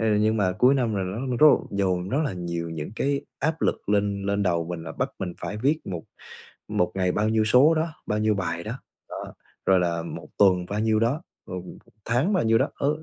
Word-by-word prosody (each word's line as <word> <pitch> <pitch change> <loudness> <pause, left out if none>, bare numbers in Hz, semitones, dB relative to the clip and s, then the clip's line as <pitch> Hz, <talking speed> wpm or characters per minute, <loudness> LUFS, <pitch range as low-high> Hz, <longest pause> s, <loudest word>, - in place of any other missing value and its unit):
Ờ, 110 - +1
nhưng 110 +1 +2
mà 95 -4 +2
cuối 125 +8 +4
năm 120 -5 +1
là 100 - 0
nó 95 +4 -4 0.2
rất 155 - +8
là - - +5
dồn 95 -2 0
rất 135 - +1
là 140 - -1
nhiều 85 -2 -4
những 80 0 -5
cái 140 0 0 0.2
áp 160 +3 -1
lực - - -1
lên 100 -1 +1
lên 100 +1 0
đầu 85 -3 +1
mình, 85 -1 -5
là 80 - -6
bắt - - -2
mình 90 -2 -3
phải 105 - -4
viết 145 +7 +1
một 90 -4 -4 0.7
một 90 - 0
ngày 90 -2 +1
bao 105 +3 +1
nhiêu 110 0 +2
số 130 +9 +6
đó, 160 +1 0 0.2
bao 105 - 0
nhiêu 110 0 +2
bài 85 -3 -3
đó, 110 - -4 0.4
đó, - - -7 0.3
rồi 95 -1 +5
là 85 -1 0
1 85 - -8
tuần 90 -3 +4
bao 105 +1 -2
nhiêu 110 0 +2
đó, 125 +8 +1 0.2
rồi 90 -1 -5
1 90 - -11 0.3
tháng 125 - +1
bao 185 - +2
nhiêu 115 0 +4
đó. - - +1
Ờ, 140 - 0
100 Hz, 240 wpm, -25 LUFS, 90-115 Hz, 0.7 s, rất